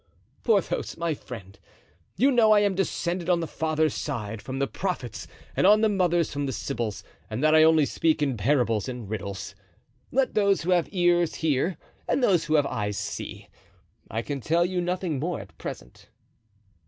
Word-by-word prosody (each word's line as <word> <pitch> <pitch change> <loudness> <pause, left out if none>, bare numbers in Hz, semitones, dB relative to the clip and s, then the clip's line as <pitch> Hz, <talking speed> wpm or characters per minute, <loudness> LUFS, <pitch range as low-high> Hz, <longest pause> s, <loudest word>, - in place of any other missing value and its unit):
"Porthos, 210 -6 0
my 165 -1 0
friend, 100 -9 -10 0.6
you 275 +3 +4
know 225 -4 +5
I 210 - +5
am 200 -1 +2
descended 180 -2 -2
on 175 -1 +4
the 165 - -2
father's 155 -1 0
side 110 -1 -4
from 130 0 -5
the 140 - +1
Prophets 155 - -4 0.3
and - - +4
on 210 +1 +6
the 220 - +4
mother's 175 -4 +1
from 145 0 -2
the - - -2
Sybils, 115 -3 -3 0.3
and 110 +6 -3
that 155 0 +5
I 155 - +7
only 160 -1 +5
speak 160 +2 +1
in 140 -4 0
parables 115 -1 +1
and 125 -4 -6
riddles. 100 -2 -5 0.6
Let 265 +1 +1
those 200 -4 +2
who 180 - 0
have 175 -2 +2
ears 175 -3 +2
hear 160 +2 0 0.3
and 265 - +1
those 185 -8 +3
who 155 - +1
have 145 -2 +4
eyes 105 -6 -2
see; - - -5 0.6
I 115 +1 -2
can 140 +1 -4
tell 170 +6 +2
you 180 0 -1
nothing 175 -4 -2
more 170 +1 -2
at 100 - -12
present." - - -8
160 Hz, 180 wpm, -26 LUFS, 125-180 Hz, 0.6 s, I